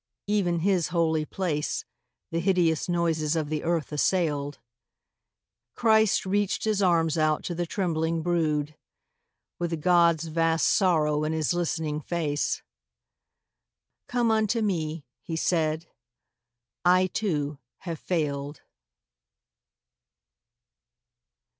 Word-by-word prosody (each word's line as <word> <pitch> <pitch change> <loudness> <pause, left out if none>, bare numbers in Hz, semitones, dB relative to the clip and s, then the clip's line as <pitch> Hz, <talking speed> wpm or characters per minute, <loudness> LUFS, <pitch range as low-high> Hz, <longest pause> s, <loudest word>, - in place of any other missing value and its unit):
(Even 185 -5 +1
His 185 -2 +2
holy 160 -2 +1
place 155 -4 -2 0.5
The 165 - 0
hideous 175 -3 +1
noises 165 -3 +1
of 155 -3 -1
the 155 -1 -2
earth 165 -3 -1
assailed.) 150 -2 0 1.2
Christ 220 -4 +3
reached 200 +1 0
His 215 -2 +1
arms 165 -3 +2
out 155 -1 +1
to 175 - -3
the 175 0 -3
trembling 165 -3 -1
brood, 155 -4 0 0.8
With 170 -2 -2
God's 170 -1 +4
vast 165 0 +1
sorrow 155 -6 +2
in 155 +1 -1
His 160 0 0
listening 160 -3 -2
face. 150 -2 -2 1.4
Come 240 -2 +1
unto 220 +1 +1
Me,' 160 -6 -2 0.2
He 165 - -5
said; 160 -1 0 1.0
'I, 180 +1 +5
too, 150 -9 -1 0.2
have 165 -4 -5
failed. 145 -4 -2
165 Hz, 105 wpm, -26 LUFS, 155-180 Hz, 1.4 s, I